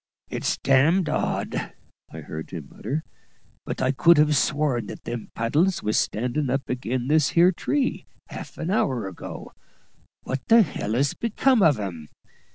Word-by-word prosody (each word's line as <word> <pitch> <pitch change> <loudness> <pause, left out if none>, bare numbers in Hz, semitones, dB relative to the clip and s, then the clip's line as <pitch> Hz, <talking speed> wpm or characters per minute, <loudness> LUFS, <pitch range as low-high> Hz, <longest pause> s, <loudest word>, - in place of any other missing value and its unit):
"It's - - -1
d 145 +8 +4
d 155 - -3
odd," - - -2 0.4
I - - -8
heard 80 0 -7
him 80 -6 -8
mutter; 145 +8 -4 0.6
"but - - -3
I 130 - +3
could 170 +4 +5
have 150 0 +4
sworn 140 -2 +1
that - - -9
them 120 -1 -5
paddles 155 +12 +1
was 105 0 0
standin' 125 +5 0
up 135 +1 -1
ag'in 125 0 -2
this 150 -2 +3
here 175 +2 +7
tree, 265 +9 -1 0.2
half - - -9
an 165 +3 -3
hour 130 - 0
ago; 95 - -8 0.7
what 130 0 -3
the 225 -2 +6
h - - -8
l's 125 +7 0
become 235 +2 +2
of 150 - +4
'em? 85 -7 -5
135 Hz, 165 wpm, -24 LUFS, 120-165 Hz, 0.7 s, here